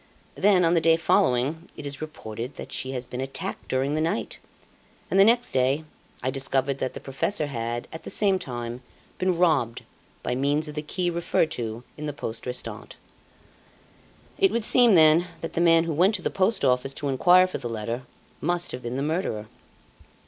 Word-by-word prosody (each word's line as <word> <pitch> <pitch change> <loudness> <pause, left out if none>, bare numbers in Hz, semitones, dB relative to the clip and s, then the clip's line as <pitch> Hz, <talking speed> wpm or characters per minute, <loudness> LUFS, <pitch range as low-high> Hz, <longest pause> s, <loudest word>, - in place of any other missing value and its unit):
Then, 190 -3 +4
on 165 - +3
the 165 - +3
day 165 0 +4
following, 150 +1 +1
it 145 - -7
is 140 0 -6
reported 125 -5 -6
that - - -9
she 130 0 -3
had 125 -1 -5
been 125 - -3
attacked 135 0 -5
during 135 +2 0
the 155 - 0
night, 155 -9 -2 0.7
and, 190 - +3
the - - +9
next 240 +3 +3
day, 130 +4 +2 0.4
I 130 - 0
discovered 135 0 -1
that 130 - -3
the - - -5
Professor 150 +6 -1
had, 120 -3 -4
at 160 - -7
the - - -8
same 195 -3 +1
time, 120 -2 -5 0.4
been 185 -2 +1
robbed 150 -10 +2 0.4
by - - -1
means 145 +4 +1
of 150 - -6
the 150 - -3
key 175 +4 -2
referred 170 -1 +1
to 115 0 -4
in 150 0 -5
the 150 - -3
poste 115 -3 -6
restante 125 0 -6
letter. - - -30 1.4
It 390 -1 +5
would 235 -2 -1
seem, 240 -5 +6
then, 160 +2 +6
that 165 -1 -5
the 170 - 0
man 165 -1 +5
who 165 -1 -2
went 185 +8 +3
to 185 - -5
the - - -1
Post 195 -2 +1
Office 130 +1 +1
to 145 - -3
inquire 180 +7 +5
for 185 - -5
the 120 - -5
letter 115 +2 -3 0.4
must 175 +2 0
have 125 - -6
been 120 +1 -4
the 135 - -1
murderer. 145 - -2
150 Hz, 200 wpm, -25 LUFS, 125-175 Hz, 1.4 s, the